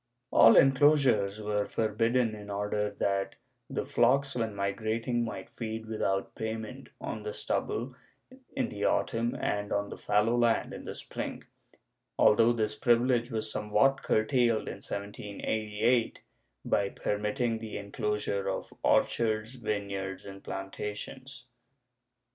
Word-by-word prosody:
All 115 - +8
enclosures 135 -7 +4
were 105 -1 -1
forbidden 115 +2 +1
in 105 -1 -9
order 105 +1 -1
that 100 -1 0 0.3
the - - -2
flocks 135 +3 +3
when 115 -4 -2
migrating 110 +4 -1
might 115 - -5
feed 110 -1 -5
without 100 -3 -1
payment 110 +4 -5
on - - -5
the 440 +2 -5
stubble - - -2 0.6
in - - 0
the 105 -1 -5
autumn 115 +1 +1
and 105 0 -1
on 100 0 0
the - - -6
fallow 110 +3 +2
land 120 -1 +2
in - - -8
the - - -5
spring, - - -6 0.7
al - - +7
though 115 +2 +4
this 110 -2 0
privilege 120 +1 +2
was 110 -2 -2
somewhat 105 +6 +2
curtailed 115 0 +2
in - - -5
1788 105 +3 -1 0.4
by 100 -1 +1
permitting 110 +4 -1
the 110 -1 -6
enclosure 100 0 -2
of - - -4
orchards, 110 0 +2
vineyards 100 -4 -4
and 95 -1 -10
plantations. 105 +7 -6
110 Hz, 125 wpm, -30 LUFS, 105-120 Hz, 0.7 s, All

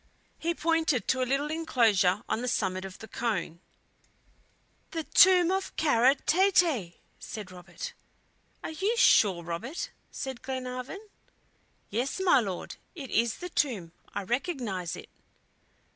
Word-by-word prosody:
He 340 +1 -1
pointed 320 - +1
to 260 - +2
a 255 - 0
little 285 +3 0
inclosure 220 - +2
on 225 - -1
the 250 - -3
summit 190 -6 -1
of 190 -1 -9
the 220 - -10
cone. 200 -7 -2 1.3
"The 325 -2 -3
tomb 365 +1 +6
of 385 0 -2
Kara 265 -3 +4
Tete!" 325 - +2 0.2
said 210 -4 -7
Robert. 180 -1 -8 0.7
"Are - - -4
you 400 +9 -1
sure, 190 - +5
Robert?" 175 - -5 0.2
said 265 -3 -5
Glenarvan. 255 - -5 0.8
"Yes, 245 - -1
my 360 -7 +5
Lord, 195 -6 -4 0.2
it 275 -7 -8
is 230 +1 +2
the 360 - -6
tomb; 220 - -1 0.2
I 200 - -3
recognize 235 - -2
it." - - -11
255 Hz, 130 wpm, -29 LUFS, 200-320 Hz, 1.3 s, tomb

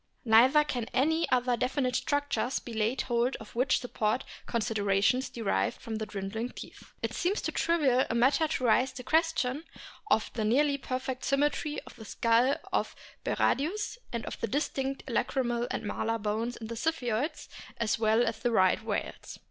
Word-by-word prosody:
Neither 250 +7 +6
can 245 -5 -3
any 320 +5 +2
other 250 -1 +2
definite 255 +1 0
structures 285 -4 0
be 235 - -7
laid 220 +4 0
hold 240 +1 0
of 220 - -11
which 255 +2 +2
support 235 0 -1 0.2
considerations 220 +1 +1
derived 195 - -1
from 220 -1 -5
the 220 0 -4
dwindling 210 +4 -4
teeth. - - -11
It - - -1
seems 380 +4 0
too - - -2
trivial 285 -7 +2
a 230 - -1
matter 265 +6 +3
to 285 - -2
raise 250 +2 +3
the 250 - -8
question 315 -2 +1 0.5
of 220 - +2
the 220 - -2
nearly 280 +6 +2
perfect 255 0 -4
symmetry 295 +2 0
of - - -15
the 220 - -10
skull 230 +5 +2 0.2
of - - 0 0.3
Berardius, 410 - 0
and 235 -1 -3
of - - -6
the - - 0
distinct 270 0 -2
lacrymal 240 -1 0
and 255 - -3
malar 220 +2 -1
bones 220 +3 -2
in 225 - -7
the 230 +1 -5
Ziphioids 260 0 -1 0.3
as 230 -1 0
well 220 +2 +3
as 230 -1 -2
in - - -19
the 240 - +1
Right 190 -1 +3
whales. 220 -2 -4
245 Hz, 170 wpm, -29 LUFS, 225-275 Hz, 0.5 s, Neither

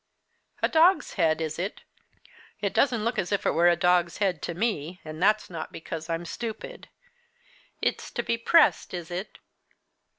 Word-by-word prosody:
"A - - +5
dog's 325 0 +4
head, 160 0 +2
is 160 0 -3
it? 190 +3 -4 0.8
it - - -2
doesn't 240 -6 +2
look 230 - 0
as 180 - -2
if 200 - 0
it - - +3
were 170 +1 +4
a 175 - +4
dog's 175 0 +2
head 190 -6 0
to 170 - -4
me, 180 -4 -2
and 155 +1 -7
that's 215 +2 +3
not 165 -3 -6
because 160 0 -7
I'm 165 +1 -2
stupid. 230 - -7 0.9
It's - - -1
to - - -2
be 230 - 0
pressed, 230 - +3
is 175 0 -7
it? 180 +4 -5
180 Hz, 170 wpm, -27 LUFS, 165-225 Hz, 0.9 s, A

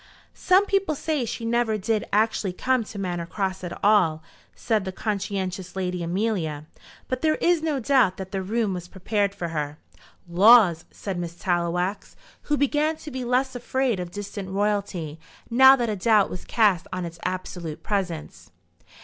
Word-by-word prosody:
"Some 380 +2 +3
people 390 -6 0
say 300 -3 -1
she 230 +1 -5
never 230 -1 +1
did 215 +1 -1
actually 210 -3 +1
come 255 +5 +1
to 210 - -10
Manor 175 -3 -3
Cross 190 0 -3
at 175 +2 -5
all," 170 -7 +3 0.3
said 220 -4 0
the 190 - -4
conscientious 190 -3 -3
Lady 180 -2 -2
Amelia; 170 -4 -2 0.4
"but 255 0 -3
there 310 -1 +3
is 345 -2 +2
no 310 -4 -1
doubt 245 -7 +3
that 190 -1 -7
the 195 -1 -2
room 210 +1 -1
was 180 -1 -6
prepared 200 +2 -1
for 175 -4 -4
her." 150 -2 -3 0.5
"Laws!" 180 -2 +6
said 190 -3 -5
Miss 170 -1 -5
Tallowax, 175 +2 -1 0.3
who 295 - +3
began 295 +3 +1
to 305 -1 -10
be 260 -1 -4
less 255 +2 +1
afraid 245 -2 -1
of 180 -1 -4
distant 200 0 -6
royalty 195 -6 -2 0.3
now 265 +3 +8
that 240 -3 -1
a 215 - -1
doubt 210 +1 +3
was 180 - -7
cast 200 -6 +2
on 185 -1 -3
its 170 0 -9
absolute 175 -3 -5
presence. 180 -6 -3
200 Hz, 165 wpm, -25 LUFS, 180-235 Hz, 0.5 s, now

